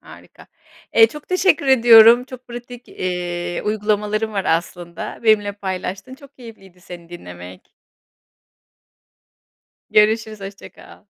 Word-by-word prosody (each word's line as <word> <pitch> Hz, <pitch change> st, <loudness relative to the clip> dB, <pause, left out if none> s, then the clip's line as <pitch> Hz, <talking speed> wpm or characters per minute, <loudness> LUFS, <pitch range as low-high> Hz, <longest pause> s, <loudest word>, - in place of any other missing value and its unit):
harika. -, -, -17 dB, 0.5 s
Eee, 225 Hz, 0 st, +7 dB
çok 300 Hz, +6 st, -12 dB
teşekkür 365 Hz, -5 st, +1 dB
ediyorum 235 Hz, -2 st, +7 dB
çok 255 Hz, -1 st, -13 dB
pratik, 240 Hz, 0 st, -11 dB
eee, 175 Hz, -1 st, -4 dB
uygulamaların 210 Hz, +1 st, -2 dB
var 195 Hz, -2 st, -3 dB
aslında. 170 Hz, +1 st, -4 dB
Benimle 210 Hz, -2 st, +2 dB
paylaştın, 195 Hz, +4 st, -6 dB
çok 280 Hz, 0 st, -18 dB
keyifliydi 195 Hz, -7 st, -15 dB
seni 175 Hz, -2 st, -12 dB
dinlemek. 90 Hz, -, -11 dB, 2.3 s
Görüşürüz 215 Hz, 0 st, +1 dB
hoşça 195 Hz, 0 st, -10 dB
kal. -, -, -17 dB
210 Hz, 105 wpm, -19 LUFS, 180-235 Hz, 2.3 s, Eee